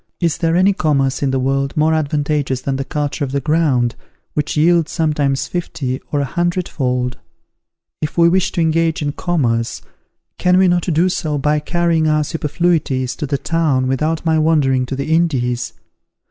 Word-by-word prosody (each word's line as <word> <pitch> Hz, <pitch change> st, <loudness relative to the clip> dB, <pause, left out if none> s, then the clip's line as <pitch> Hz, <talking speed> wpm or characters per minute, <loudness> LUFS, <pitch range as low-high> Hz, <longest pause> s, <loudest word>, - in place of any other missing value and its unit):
Is 170 Hz, -3 st, 0 dB
there 165 Hz, -1 st, +1 dB
any 190 Hz, +3 st, +4 dB
commerce 140 Hz, -6 st, 0 dB
in 140 Hz, -, +1 dB
the 135 Hz, -, 0 dB
world 135 Hz, +2 st, -1 dB
more 155 Hz, +1 st, +3 dB
advantageous 145 Hz, -3 st, -1 dB
than 135 Hz, 0 st, -2 dB
the 135 Hz, -, -2 dB
culture 145 Hz, +1 st, -3 dB
of 135 Hz, -, -3 dB
the 140 Hz, -, +1 dB
ground, 140 Hz, -5 st, +1 dB, 0.4 s
which 150 Hz, 0 st, -2 dB
yields 165 Hz, +1 st, +3 dB
sometimes 150 Hz, -4 st, 0 dB
fifty 135 Hz, -7 st, -3 dB
or 145 Hz, -, +1 dB
a -, -, 0 dB
hundred 175 Hz, +5 st, -1 dB
fold? 125 Hz, -2 st, -2 dB, 0.8 s
If 150 Hz, -, -3 dB
we 170 Hz, 0 st, +6 dB
wish 185 Hz, +2 st, +2 dB
to 170 Hz, -, 0 dB
engage 165 Hz, -1 st, +1 dB
in 145 Hz, -, -1 dB
commerce, 120 Hz, -9 st, -1 dB, 0.6 s
can 180 Hz, 0 st, +3 dB
we 190 Hz, 0 st, +5 dB
not 175 Hz, 0 st, +1 dB
do 165 Hz, +4 st, +3 dB
so 155 Hz, -5 st, -1 dB
by 150 Hz, +2 st, +1 dB
carrying 165 Hz, 0 st, +1 dB
our 155 Hz, 0 st, +2 dB
superfluities 150 Hz, -4 st, -1 dB
to 150 Hz, -, -3 dB
the 140 Hz, +1 st, 0 dB
town 150 Hz, -4 st, 0 dB
without 155 Hz, +6 st, -1 dB
my 160 Hz, -1 st, +2 dB
wandering 140 Hz, -5 st, +2 dB
to 135 Hz, -, -3 dB
the 140 Hz, +4 st, -2 dB
Indies? 125 Hz, -8 st, 0 dB
150 Hz, 175 wpm, -18 LUFS, 135-165 Hz, 0.8 s, we